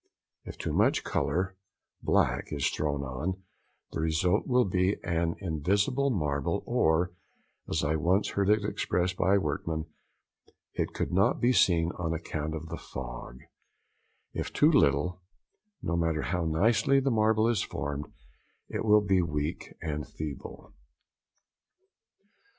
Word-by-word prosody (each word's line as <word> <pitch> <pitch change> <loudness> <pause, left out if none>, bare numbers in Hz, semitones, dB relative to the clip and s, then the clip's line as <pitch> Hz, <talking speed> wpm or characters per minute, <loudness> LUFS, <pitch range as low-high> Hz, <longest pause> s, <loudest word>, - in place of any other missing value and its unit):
If - - -8
too - - -3
much - - +3
colour 90 +6 -1 0.5
(black) - - +2
is 70 -2 0
thrown 70 -2 -1
on, 80 +9 -4 0.5
the - - -4
result 80 +5 +1
will 125 -1 +4
be 95 +1 +1
an 85 -1 0
invisible 100 - +1
marble, 75 - -1
or, 80 +3 +2 0.6
as 80 - 0
I 80 +1 +1
once 90 +6 +2
heard 100 0 0
it 105 -1 +3
expressed 90 -3 0
by 95 +2 +3
a - - +4
workman, 80 0 -2 0.9
"it - - -2
could - - -2
not 95 +2 +3
be 125 +2 +3
seen 85 -6 +3
on 80 -2 -1
account 80 -1 -4
of 80 +1 -7
the - - -4
fog;" - - -8 0.9
if - - -3
too 150 +2 +4
little, 90 - +2 0.6
no 85 - -1
matter 80 -2 0
how 90 0 -1
nicely 115 - +3
the 135 0 +1
marble 110 0 +3
is 115 -5 +2
formed, 70 +1 -4 0.6
it - - -3
will 105 -1 +5
be 95 -2 +2
weak 75 -1 -3
and 75 -2 -3
feeble. 75 -3 -7
85 Hz, 140 wpm, -29 LUFS, 75-100 Hz, 0.9 s, will